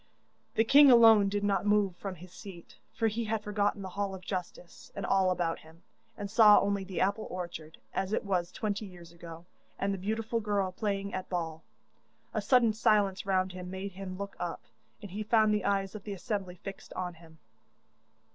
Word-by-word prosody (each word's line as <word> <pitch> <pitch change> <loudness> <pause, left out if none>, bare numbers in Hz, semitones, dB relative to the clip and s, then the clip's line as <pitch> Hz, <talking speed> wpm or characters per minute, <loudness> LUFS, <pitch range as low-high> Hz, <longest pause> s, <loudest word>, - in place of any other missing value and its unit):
The 225 - +4
king 280 +4 +7
alone 225 -4 +7
did 205 +1 -2
not 200 -2 +1
move 205 -3 +2
from 195 +1 -6
his 180 +1 -13
seat, 190 -5 -11 0.2
for 225 - 0
he 225 +2 -2
had 220 0 -2
forgotten 205 -1 -1
the 190 - -5
hall 195 +1 -3
of 185 - -11
justice 180 -2 -6
and - - -4
all 190 -1 +3
about 175 -2 -1
him, 160 +2 -18 0.3
and 205 - -4
saw 210 0 +7
only 200 -1 0
the 190 -1 -5
apple 200 +3 0
orchard, 170 -3 -7 0.2
as 190 0 -2
it 215 - -1
was 180 -3 -1
twenty 210 -1 -3
years 175 -3 -13
ago, 170 0 -11 0.3
and 195 0 -1
the 195 - -4
beautiful 220 +4 -2
girl 205 -3 -1
playing 200 +1 -3
at 185 0 -4
ball. 165 -3 -3 0.7
A - - -1
sudden 240 -4 +4
silence 205 -3 +2
round 190 -1 +1
him 180 0 -8
made 190 +2 -5
him 185 0 -7
look 200 0 -6
up, 175 -1 -4 0.4
and 200 - -8
he 205 +3 -4
found 215 0 +3
the 210 -2 -1
eyes 195 -1 0
of 215 -2 -8
the 205 - -5
assembly 195 -1 -4
fixed 195 +2 -9
on 180 -1 -4
him. 160 -1 -17
195 Hz, 195 wpm, -30 LUFS, 180-210 Hz, 0.7 s, king